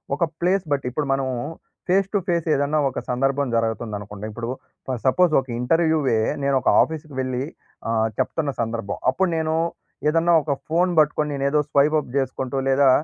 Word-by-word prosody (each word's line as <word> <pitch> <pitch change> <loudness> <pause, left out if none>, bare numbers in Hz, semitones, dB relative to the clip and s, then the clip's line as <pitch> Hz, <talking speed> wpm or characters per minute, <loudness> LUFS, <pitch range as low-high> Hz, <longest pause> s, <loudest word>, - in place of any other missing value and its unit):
ఒక 170 - -1 0.2
ప్లేస్ 185 +2 +2
బట్టి 140 -2 0
ఇప్పుడు 145 +1 -2
మనం 135 0 0 0.6
ఫేస్ 195 +1 +3
టు - - +3
ఫేస్ 170 -2 0
ఏదన్నా 145 +2 +1
ఒక - - -4
సందర్భం 135 +2 +1
జరగతంది 115 -1 -1
అనుకోండి. 105 0 -8
ఇప్పుడు 115 +2 -5 0.4
ఫర్ 130 -3 -2
సపోజ్ 175 +6 +4
ఒక 130 - -6
ఇంటర్‌వ్యూయే, 155 -3 +2 0.2
నేనొక 135 -2 +2
ఆఫీస్‌కి 155 -2 -3
వెళ్లి 130 0 -2 0.5
ఆహ్, 110 -1 +2
చెప్తున్న 150 -3 0
సందర్భం. 115 -2 -3
అప్పుడు 190 +6 +1
నేను 160 0 0 0.5
ఏదన్నా 165 +2 +3
ఒక 150 - -2 0.2
ఫోన్ 175 +3 +2
పట్టుకొని 150 0 +2
నేను 140 0 -2
ఏదో 150 +1 +2
స్వైప్ 150 +2 +3
అప్ 130 - -8
చేసుకుంటూ 135 0 -2
లేదా, 135 0 +4
140 Hz, 165 wpm, -23 LUFS, 125-160 Hz, 0.6 s, సపోజ్